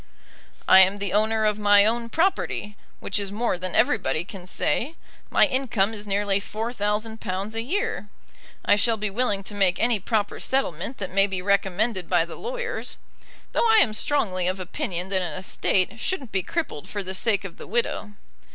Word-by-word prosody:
I 190 - +9
am 190 +1 +5
the 200 -2 -3
owner 220 +1 +2
of 210 0 +1
my 205 -1 +6
own 230 +1 0
property, 315 - 0 0.2
which 200 - -2
is 200 -1 -4
more 215 -3 -1
than 185 0 -4
everybody 205 - +2
can 185 -1 -10
say. 240 - -1 0.3
My - - +5
income 245 -7 0
is 210 -1 -7
nearly 200 0 +1
£4,000 215 -2 -3
a 225 - -1
year. 240 - -2 0.6
I 205 - +5
shall 220 +2 +2
be 210 -1 -2
willing 205 -3 0
to 205 - -5
make 195 -3 +2
any 230 -2 +2
proper 210 +1 -1
settlement 255 - -1
that 190 -2 -5
may 195 +1 +4
be 190 -2 -4
recommended 200 0 0
by 165 - +3
the 170 - -9
lawyers, - - -5 0.5
though 465 - +2
I 445 - +6
am 220 - +4
strongly 200 -7 0
of 185 +1 -1
opinion 185 - -4
that 190 -1 +1
an 175 -3 -1
estate 190 +3 0
shouldn't 270 - -3
be 190 - +1
crippled 295 - -4
for 205 -1 -3
the 190 0 -4
sake 205 +1 +1
of 185 - -8
the - - -10
widow. 215 -1 -1
205 Hz, 180 wpm, -24 LUFS, 190-230 Hz, 0.6 s, I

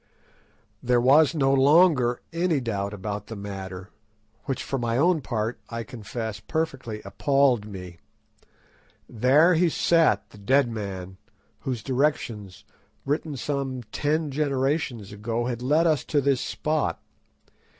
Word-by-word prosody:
There 125 0 +2
was 145 +5 +5
no 135 -3 +3
longer 135 -3 +4
any 165 -3 +1
doubt 100 -5 -3
about 105 0 -5
the 115 - -7
matter, 95 -2 -7 0.5
which 135 -4 -3
for 135 - -3
my 120 -1 -1
own 165 +2 +3
part 115 -2 -3
I 115 0 -4
confess 110 -1 -6
perfectly 130 -9 -3
appalled 130 0 +2
me. 90 -4 -9 1.1
There 135 +10 +4
he 170 +1 +3
sat, 155 -12 +2
the 105 - -14
dead 130 +6 +3
man, 95 -4 -6 0.4
whose 125 -4 -4
directions, 125 -8 -1 0.4
written 145 +1 -2
some 135 -2 -3
ten 150 0 0
generations 135 -6 -1
ago, 115 +3 -3
had 120 -1 -3
led 150 +6 +3
us 155 -5 +2
to 150 - +1
this 140 -2 +1
spot. 155 -1 -1
125 Hz, 130 wpm, -25 LUFS, 105-145 Hz, 1.1 s, was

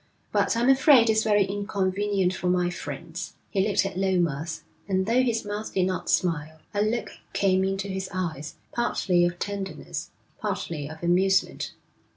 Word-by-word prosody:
But - - +2
I'm 240 +2 +2
afraid 265 -3 +6
it's 220 0 +3
very 205 -2 +3
inconvenient 200 -1 0
for 180 - -3
my 180 0 +2
friends.' 165 +3 -6 0.2
He 195 - +2
looked 200 0 +2
at 190 -2 -3
Lomas, 170 -5 0 0.2
and 190 -1 +1
though 235 +4 +3
his 235 -4 0
mouth 205 +1 -4
did 185 -1 +3
not 185 0 -2
smile, 160 -3 0 0.2
a 205 - +1
look 220 +3 0 0.2
came 190 -1 +3
into 195 +1 -1
his 190 -1 -4
eyes, 160 -5 -4 0.2
partly 180 -7 +2
of 175 0 -4
tenderness, 200 0 -5 0.3
partly 150 -4 -3
of 160 +2 -10
amusement. 190 +3 +2
190 Hz, 160 wpm, -26 LUFS, 175-205 Hz, 0.3 s, afraid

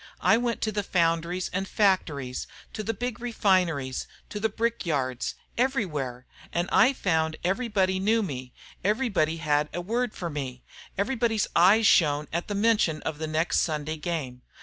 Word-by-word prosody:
I - - +5
went 235 0 -1
to 215 - 0
the 210 0 -1
foundries 170 -1 0
and 190 +1 -1
factories, 150 -12 0 0.3
to 215 - -4
the 215 - -1
big 245 +2 -4
refineries, 185 - +1 0.2
to 210 - -5
the 220 +1 +1
brick 230 +3 -1
yards 130 -6 -1 0.2
everywhere. 150 - -1 0.3
And 175 +1 0
I 255 - +6
found 160 - 0
everybody 190 -1 +1
knew 220 +3 +2
me; 130 -8 -5 0.3
everybody 200 -7 +1
had 150 -2 +1
a - - -1
word 235 +5 -1
for 170 -2 -4
me; 130 -4 -5 0.3
everybody's 225 0 +1
eyes 200 +6 +6
shone 150 -6 +4
at 170 +1 -2
the 205 - -3
mention 210 -7 +2
of 155 -2 -4
the 160 - -2
next 155 +2 +1
Sunday 155 0 -1
game. 150 -6 -4
180 Hz, 160 wpm, -27 LUFS, 155-215 Hz, 0.3 s, I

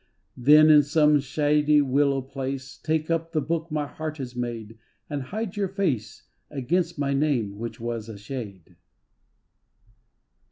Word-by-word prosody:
Then 150 +5 +6
in 150 -1 +8
some 150 0 +3
shady 150 +2 +2
willow 140 0 +2
place 135 0 -5
Take 155 +1 -2
up 165 0 -1
the 155 - +2
book 165 +3 -2
my 150 -2 -1
heart 155 +1 -6
has 125 -3 -6
made, 115 -2 -5 0.3
And 145 -1 -2
hide 205 - -5
your 200 -1 0
face 145 - -2 0.3
Against 165 +5 -1
my 140 -1 0
name 125 -9 0
which 115 0 -6
was 115 -1 -4
a 110 - -8
shade. 100 - -8
145 Hz, 145 wpm, -25 LUFS, 125-155 Hz, 0.3 s, in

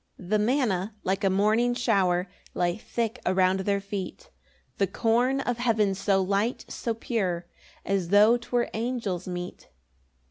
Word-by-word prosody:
3 180 - -11
The 215 0 +3
manna, 215 -4 0
like 195 +2 -1
a 195 - +4
morning 215 +5 +2
shower, 190 -7 +2 0.3
Lay 175 -1 +1
thick 230 +2 -3
around 185 +1 +2
their 200 +1 0
feet; 200 - -6 0.5
The 195 - +3
corn 245 +7 +1
of 245 -3 -2
heaven, 220 -5 +2
so 195 0 +1
light, 200 +5 0
so 230 -1 -3
pure, 190 -7 -2 0.4
As 195 -3 0
tho' 210 +4 +6
'twere 240 0 -1
angels' 225 -6 -2
meat. 180 - -6
205 Hz, 145 wpm, -27 LUFS, 190-235 Hz, 0.5 s, tho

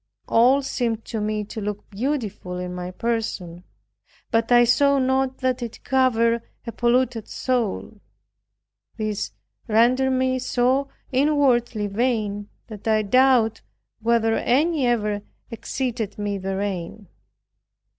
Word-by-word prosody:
All 255 +5 +4
seemed 230 -4 -2
to 220 -2 -4
me 210 0 -1
to 215 +1 -7
look 205 0 -5
beautiful 210 -6 -3
in 180 0 -4
my 180 0 -5
person, 185 -5 -3 0.7
but 230 +1 +1
I 240 0 +7
saw 280 +4 +4
not 265 0 +1
that 255 -1 0
it 235 -1 -7
covered 235 -3 +2 0.2
a 230 - -4
polluted 240 0 +1
soul. 230 -4 -2 1.0
This 215 -2 -2 0.4
rendered 245 +4 +3
me 260 0 +1
so 255 +2 +1 0.2
inwardly 255 -6 +2
vain, 205 -1 -1 0.2
that 215 -1 -9
I 215 -1 +3
doubt 250 0 +3 0.4
whether 225 0 +2
any 295 +1 +2
ever 210 -4 0 0.3
exceeded 230 -2 -3
me 205 -1 -2
therein. 195 0 -4
230 Hz, 115 wpm, -23 LUFS, 210-255 Hz, 1.0 s, I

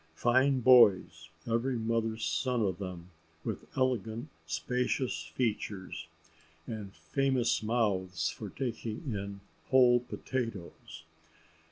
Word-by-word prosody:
Fine 130 +5 +3
boys, 95 -10 +5 0.2
every 120 +2 0
mother's 115 -1 -1
son 125 -3 0
of 95 -3 -1
them, 90 -2 -7 0.3
with - - -4
elegant 125 0 0 0.2
spacious 125 - -1
features, 105 -8 -2 0.6
and 105 -3 -6
famous 135 -4 +1
mouths 95 -7 0
for 105 +3 -5
taking 120 - -4
in 100 0 -5 0.3
whole 125 -2 +6
potatoes. 115 -10 -5
115 Hz, 95 wpm, -31 LUFS, 100-125 Hz, 0.6 s, whole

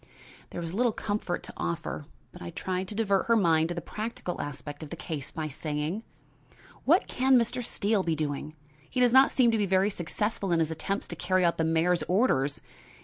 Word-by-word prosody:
There - - -6
was 165 0 -5
little 240 +3 +2
comfort 205 -5 -2
to - - -8
offer, 165 -3 -3 0.2
but 180 - -13
I - - -5
tried 185 +3 -3
to 210 - -6
divert 200 -3 +1
her 230 - +5
mind 165 -6 +3
to 175 - -3
the 170 - -3
practical 215 -4 -4
aspect 145 +1 -7
of 155 - -7
the 170 - -5
case 155 -5 -5
by 155 -1 -4
saying: 155 +5 -3 0.8
"What - - +5
can 260 0 +4
Mr. 240 +1 0
Steele 210 -2 +1
be 165 -3 0
doing? 150 0 -3 0.3
He 255 - -2
does 245 -1 +4
not 265 +1 +7
seem 245 -3 +4
to 225 - +1
be 205 - +1
very 190 +2 +3
successful 195 +2 -2
in 170 - +4
his 160 -1 +1
attempts 195 +5 -2
to 170 - -3
carry 185 +2 +1
out 170 - +1
the - - +3
mayor's 165 +2 +2
orders. 145 - +2
180 Hz, 205 wpm, -28 LUFS, 160-210 Hz, 0.8 s, not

